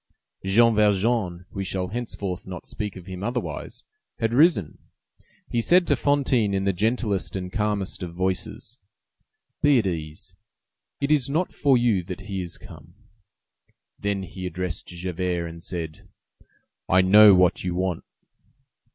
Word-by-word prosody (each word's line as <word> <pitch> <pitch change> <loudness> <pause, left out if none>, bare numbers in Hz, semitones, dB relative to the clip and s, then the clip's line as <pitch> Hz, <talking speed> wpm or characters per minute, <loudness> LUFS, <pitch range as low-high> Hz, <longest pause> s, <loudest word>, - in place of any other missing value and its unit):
Jean 115 +5 +4
Valjean—we 100 -3 0
shall 95 -1 -2
henceforth 100 -6 -5
not 90 -2 -7
speak 105 -2 -5
of 90 -2 -10
him 95 -1 -7
otherwise—had 120 - -5
risen. 145 - +3 0.7
He 120 - 0
said 175 +8 +4
to 145 - +2
Fantine 130 -7 +1
in 95 - 0
the 100 0 +1
gentlest 105 0 -1
and 90 -1 -5
calmest 105 -2 -1
of 90 -2 -5
voices:— 95 +1 -3 0.8
"Be 145 -2 +5
at 115 - +1
ease; 80 -4 -5 0.7
it 140 +1 -1
is 140 -4 +2
not 165 +6 -1
for 140 -3 +3
you 120 -6 +2
that 95 +2 -7
he 95 -1 -4
is 85 -2 -7
come." 80 +1 -14 1.0
Then 100 -1 -1
he 95 +1 -6
addressed 90 0 -4
Javert, 90 0 -3
and 85 0 -10
said:— 85 -3 -6 0.8
"I 95 +1 +5
know 100 +2 +8
what 90 -1 +3
you 90 -1 -2
want." 90 -2 -1
95 Hz, 140 wpm, -24 LUFS, 90-115 Hz, 1.0 s, know